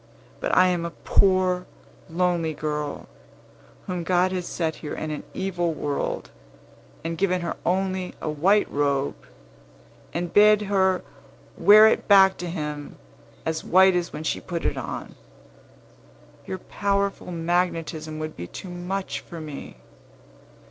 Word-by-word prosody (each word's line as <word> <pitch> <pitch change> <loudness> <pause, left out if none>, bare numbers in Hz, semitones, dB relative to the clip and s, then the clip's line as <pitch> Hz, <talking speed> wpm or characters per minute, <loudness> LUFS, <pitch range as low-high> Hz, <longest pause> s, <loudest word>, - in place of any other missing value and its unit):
But - - 0
I 185 - +7
am 175 -2 0
a 170 - -2 0.2
poor, 185 -1 +3 0.4
lonely 170 -2 0
girl, 150 -1 -4 0.8
whom 180 -2 -3
God 180 +2 +2
has 180 -2 -3
set 160 -2 -2
here 150 - -6
in 155 - -4
an 150 - -4
evil 175 -3 -1
world, 145 -1 -3 0.7
and 165 0 -4
given 185 -2 +1
her 170 - -3
only 185 0 -1
a - - -5
white 180 +8 +3
robe, 140 -1 +1 1.0
and 170 0 -3
bid 210 0 +6
her 190 -2 +2 0.5
wear 215 +1 +8
it 220 - +3
back 195 -2 +7
to 180 - -5
Him, 150 -3 -5 0.5
as 160 0 -2
white 190 +1 +5
as 175 -1 -1
when 150 - -6
she - - -1
put 170 -2 -4
it - - +1
on. - - -6 1.3
Your 190 - -3
powerful 200 0 -1
magnetism 165 -2 -1
would 155 0 -5
be 85 - -7
too 185 - -9
much 185 +2 -3
for 170 - -10
me. 150 -3 -8
175 Hz, 140 wpm, -25 LUFS, 160-190 Hz, 1.3 s, wear